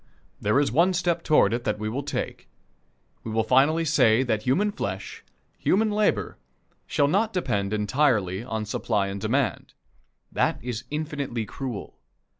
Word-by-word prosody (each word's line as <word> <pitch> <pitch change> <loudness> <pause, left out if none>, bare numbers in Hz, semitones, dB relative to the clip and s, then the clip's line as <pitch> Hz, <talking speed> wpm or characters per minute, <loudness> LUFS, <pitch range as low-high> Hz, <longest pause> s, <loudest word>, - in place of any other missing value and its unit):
There 105 +7 +3
is 145 - +1
one 175 +4 +3
step 175 -1 0
toward 150 -11 +3
it 120 0 -2
that 105 -2 -1
we 110 0 -4
will 125 +6 -2
take: 145 - -5 0.7
we - - -6
will 110 0 +1
finally 145 +8 +3
say 125 -5 +4
that 110 -4 0
human 175 - +1
flesh, 205 - -5 0.4
human 215 +3 +2
labor, 210 0 0 0.5
shall 145 -2 +2
not 205 +8 +1
depend 100 - -1
entirely 105 -3 +1
on 110 -3 -3
"supply 100 -1 -1
and 100 0 -5
demand." 125 +4 -1 0.6
That - - +1
is 120 -1 -4
infinitely 145 -6 -3
cruel. 125 -3 -6
130 Hz, 150 wpm, -25 LUFS, 110-155 Hz, 0.7 s, say